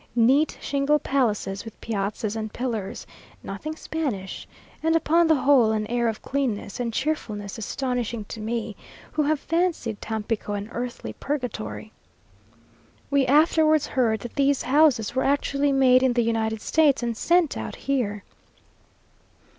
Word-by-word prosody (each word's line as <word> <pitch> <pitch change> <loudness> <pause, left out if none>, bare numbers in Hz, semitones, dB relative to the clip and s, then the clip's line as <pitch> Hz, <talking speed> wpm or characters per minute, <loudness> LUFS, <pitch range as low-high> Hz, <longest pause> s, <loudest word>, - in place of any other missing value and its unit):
Neat 265 +6 +3
"shingle 285 +1 +1
palaces," 215 -9 -1
with 225 -2 -11
piazzas 210 0 -3
and 220 -1 -4
pillars; 225 -6 -4 0.4
nothing 310 +11 -5
Spanish, 270 -14 -4 0.3
and 325 +1 +2
upon 330 +1 +3
the 320 - +5
whole, 260 -5 +4
an 215 -1 0
air 235 +2 0
of 220 -1 -3
cleanness 250 -7 -2
and 240 -2 -1
cheerfulness 220 -7 -3
astonishing 240 -2 -3
to 220 - -8
me 220 0 -3 0.4
who 310 - 0
have 300 0 +1
fancied 330 - -1
Tampico 220 -1 -3
an 205 +1 -4
earthly 245 +1 -5
purgatory. 110 - -4 1.2
We 275 -2 +3
afterwards 310 +1 +4
heard 225 -5 0
that 240 - -7
these 280 -1 +2
houses 265 -5 +3
were 260 - +1
actually 280 0 +1
made 260 -2 +5
in 260 -1 +3
the 240 -1 +2
United 220 -1 -1
States 295 -5 +3
and 235 -1 -1
sent 340 +5 +2
out - - -5
here. 220 -7 -2
245 Hz, 140 wpm, -25 LUFS, 220-285 Hz, 1.2 s, the